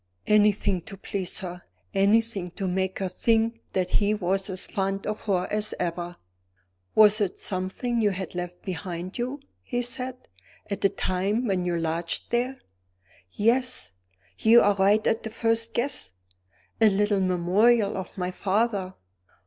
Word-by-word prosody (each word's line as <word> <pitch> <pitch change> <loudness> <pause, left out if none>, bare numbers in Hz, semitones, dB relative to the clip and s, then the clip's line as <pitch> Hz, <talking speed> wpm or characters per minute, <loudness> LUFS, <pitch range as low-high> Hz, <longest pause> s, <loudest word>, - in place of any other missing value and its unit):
Anything 205 -3 +3
to 200 -3 -9
please 190 +1 -4
her! 180 -1 -6 0.3
Anything 200 -1 +2
to 195 -3 -2
make 190 +1 -1
her 190 - -1
think 225 +4 +1
that 185 -1 0
he 210 0 +2
was 195 0 -1
as 185 -1 -3
fond 195 0 -2
of 215 0 -4
her 185 -4 +1
as 210 0 0
ever! 175 0 -3 0.8
"Was 215 0 +6
it 195 -3 0
something 195 +6 -2
you 210 - +4
had 190 -1 -5
left 180 0 -6
behind 180 +1 -5
you," 255 +4 -2 0.2
he 245 -1 -2
said, 250 +1 -3 0.5
"at 200 - -2
the 195 - +4
time 195 +8 -1
when 190 -5 0
you 175 -1 0
lodged 165 +1 -2
there." 250 +3 0 0.8
"Yes! 250 - +1 0.5
you 230 +2 +7
are 205 - +4
right 200 +2 +3
at 225 - +2
the 220 - -5
first 225 +1 0
guess 235 - -2 0.7
a 220 - +7
little 205 0 +2
memorial 195 +5 +3
of 190 +1 -6
my 180 0 -2
father. 195 0 0
200 Hz, 150 wpm, -26 LUFS, 185-225 Hz, 0.8 s, you